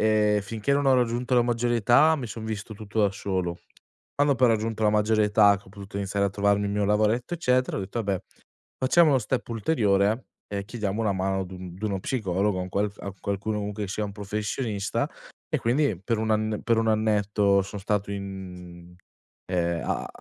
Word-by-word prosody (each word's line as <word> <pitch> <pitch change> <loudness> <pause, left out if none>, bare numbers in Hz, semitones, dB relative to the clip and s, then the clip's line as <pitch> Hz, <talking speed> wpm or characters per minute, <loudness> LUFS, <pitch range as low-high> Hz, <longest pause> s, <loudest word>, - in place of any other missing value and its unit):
ehm, 105 -1 +3
finché 110 +6 -2
non 140 0 +2
ho 135 - +6
raggiunto 125 +1 +1
la 120 - +5
maggiore 120 0 +1
età, 120 +8 +5
mi 130 -5 -4
son 110 +1 -7
visto 110 0 -5
tutto 110 +1 -3
da 100 -2 +4
solo. 95 -3 -2 0.6
Quando 145 -1 +3
poi 125 0 +4
ho - - +4
raggiunto 110 0 -2
la 105 - +5
maggiore 105 0 +3
età, 105 -1 +5
che 100 - -15
ho - - -14
potuto 100 0 -9
iniziare 100 0 0
a 100 - -2
trovarmi 100 +1 +1
il 100 - -2
mio 105 0 +1
lavoretto 110 - +1
eccetera, 130 -6 +1
ho - - -2
detto: 95 +5 -5
"Abbé 100 -4 -2 0.6
facciamo 155 +5 +5
uno 135 - +4
step 125 +2 -2
ulteriore 110 -2 +1 0.2
e 100 -1 -3
chiediamo 105 -1 -3
una 105 -2 +1
mano 95 0 -1
ad 95 - -5
un 90 -1 -8
d'uno 100 0 -3
psicologo, 100 -4 0
a - - -1
un 90 - -6
qual 100 +1 0
f 100 - -23
a 100 - -5
qualcuno 100 +2 -2
comunque 105 0 -3
che 95 - -6
sia 105 - -2
un 100 - -5
professionista." 105 +1 -2 0.4
E - - +2
quindi 125 - +1
per 115 +2 0
1 110 0 -1
anne 110 0 0
per 115 -1 +2
1 115 - +1
annetto 105 -2 +2
son 100 +1 -7
stato 100 0 -1
in 90 -3 -8 0.5
ehm, 85 -2 0
a - - -2
105 Hz, 210 wpm, -26 LUFS, 100-115 Hz, 0.6 s, ho